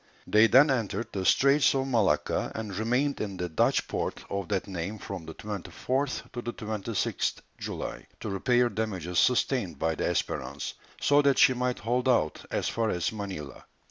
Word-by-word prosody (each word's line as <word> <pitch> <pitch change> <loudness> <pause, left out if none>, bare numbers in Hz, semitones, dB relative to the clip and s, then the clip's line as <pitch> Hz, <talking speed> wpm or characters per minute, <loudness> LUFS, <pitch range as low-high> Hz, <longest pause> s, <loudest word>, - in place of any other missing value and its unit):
They 110 +2 +5
then 135 +5 +6
entered 115 -3 -1
the 95 -2 -2
Straits 140 +5 +4
of 135 0 +1
Malacca, 115 -7 +1
and 110 -3 -4
remained 125 +7 0
in 100 -3 -4
the 90 - -2
Dutch 80 - +2
port - - -3
of 100 -2 -2
that 100 -3 0
name 95 +2 -4
from 95 -5 -7
the 80 - -8
24th 125 +6 -3
to 120 - -5
the 120 0 -4
26th 110 -1 -2 0.2
July, - - -5
to 110 - -4
repair 120 +5 +3
damages 95 -5 -2
sustained 120 - +2
by 80 +3 0
the - - -2
Espérance, 70 +2 -2 0.3
so 145 0 +4
that 140 -2 +3
she 130 - +6
might 125 0 -1
hold 125 +3 0
out 80 -12 +1
as - - -1
far 115 -1 0
as 90 -4 0
Manilla. 95 - -7
110 Hz, 175 wpm, -28 LUFS, 95-125 Hz, 0.3 s, then